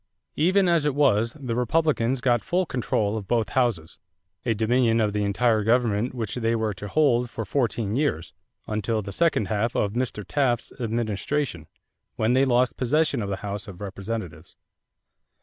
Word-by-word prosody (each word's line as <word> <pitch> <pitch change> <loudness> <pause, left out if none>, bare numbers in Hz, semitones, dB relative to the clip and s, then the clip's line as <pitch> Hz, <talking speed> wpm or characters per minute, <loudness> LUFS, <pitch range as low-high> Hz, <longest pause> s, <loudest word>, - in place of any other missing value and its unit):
Even 185 +4 +3
as 170 -3 +3
it 150 -2 0
was, 115 -6 +3
the 125 -4 -3
Republicans 130 -1 +1
got 120 -3 +2
full 180 +1 0
control 110 -7 -1
of 100 -3 -6
both 115 -3 +1
houses 115 -11 -1 0.4
a 115 - 0
dominion 115 +1 +2
of 105 -2 +1
the 105 0 0
entire 110 +2 +2
government 115 +1 +1
which 115 -3 -3
they 115 -1 0
were 110 -2 -1
to 105 +2 -8
hold 125 -2 +2
for 115 -2 -5
fourteen 115 -3 -1
years 120 - -1 0.3
until 110 0 -1
the 100 - -6
second 165 -6 +1
half 110 +3 -1
of 100 -1 0
Mr. 120 -4 -3
Taft's 130 -5 0
administration, 115 - -2 0.5
when 110 +2 +1
they 130 +2 +4
lost 125 -1 +2
possession 150 +1 +1
of 100 - -3
the 100 - -1
House 100 0 -4
of 95 -3 -10
Representatives. 100 -5 -6
115 Hz, 165 wpm, -25 LUFS, 105-130 Hz, 0.5 s, they